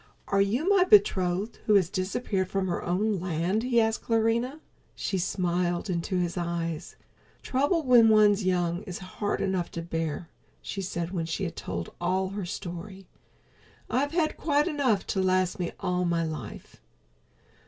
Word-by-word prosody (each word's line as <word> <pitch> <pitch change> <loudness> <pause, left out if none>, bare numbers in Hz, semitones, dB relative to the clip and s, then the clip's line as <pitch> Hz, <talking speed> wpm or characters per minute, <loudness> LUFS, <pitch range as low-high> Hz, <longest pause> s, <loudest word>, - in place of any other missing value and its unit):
"Are 200 0 +3
you 235 - +1
my 395 -2 +5
betrothed 200 - +3
who 210 - +5
has 190 -4 +4
disappeared 190 0 -2
from 195 -1 -1
her 175 - -2
own 195 +3 0
land?" 180 +4 0
he 245 -1 +2
asked 220 0 +1
Clarinha. 230 +5 +1 0.4
She 190 - -2
smiled 175 0 -1
into 175 +2 -1
his 175 0 -1
eyes. 170 -2 -3 0.5
"Trouble 285 +6 +1
when 240 -4 +6
one's 210 -1 +5
young 175 -1 0
is 180 - -5
hard 200 +2 -3
enough 190 -3 -1
to 170 - -4
bear," 165 -1 -3 0.3
she 195 - -5
said 170 -2 -3
when 170 -4 -2
she 165 +4 -3
had 170 - -3
told 85 -1 -5
all 185 +2 0
her 195 -2 -5
story. 185 +2 -7 0.9
"I've 275 +3 +1
had 330 -3 +1
quite 295 0 +2
enough 270 - +1
to 190 - -1
last 185 -1 +1
me 175 -1 -2
all 180 -2 0
my 170 -1 +1
life." 155 - -7
190 Hz, 160 wpm, -27 LUFS, 175-220 Hz, 0.9 s, when